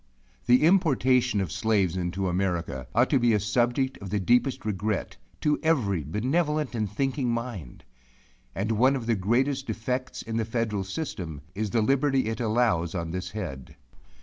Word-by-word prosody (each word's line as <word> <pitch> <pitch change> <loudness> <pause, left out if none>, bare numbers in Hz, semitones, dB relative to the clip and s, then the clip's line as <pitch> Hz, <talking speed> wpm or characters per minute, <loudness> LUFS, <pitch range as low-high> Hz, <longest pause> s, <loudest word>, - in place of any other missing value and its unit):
The 125 +4 +5
importation 130 - +3
of 95 - -3
slaves 100 -3 +1
into 90 +1 -2
America 85 -8 -2
ought 120 +3 +3
to 140 - +4
be 120 -1 +3
a 105 - +3
subject 120 +5 0
of 100 - -7
the 105 - 0
deepest 120 +5 +2
regret, 105 0 -2 0.2
to 150 -1 +2
every 115 - +1
benevolent 145 - 0
and 110 -3 -1
thinking 135 +2 -1
mind. 115 - -4 0.7
And 105 +3 -1
one 130 +5 +4
of 125 -4 -4
the 115 - +2
greatest 130 +8 0
defects 125 +4 -3
in 115 0 -3
the 115 - +1
federal 110 -3 -2
system, 90 - -5
is 105 +2 -2
the 115 +1 +1
liberty 135 +2 +2
it 110 - -3
allows 110 -7 +1
on 85 -2 -3
this 90 +1 -4
head. 90 - -6
110 Hz, 165 wpm, -27 LUFS, 95-130 Hz, 0.7 s, The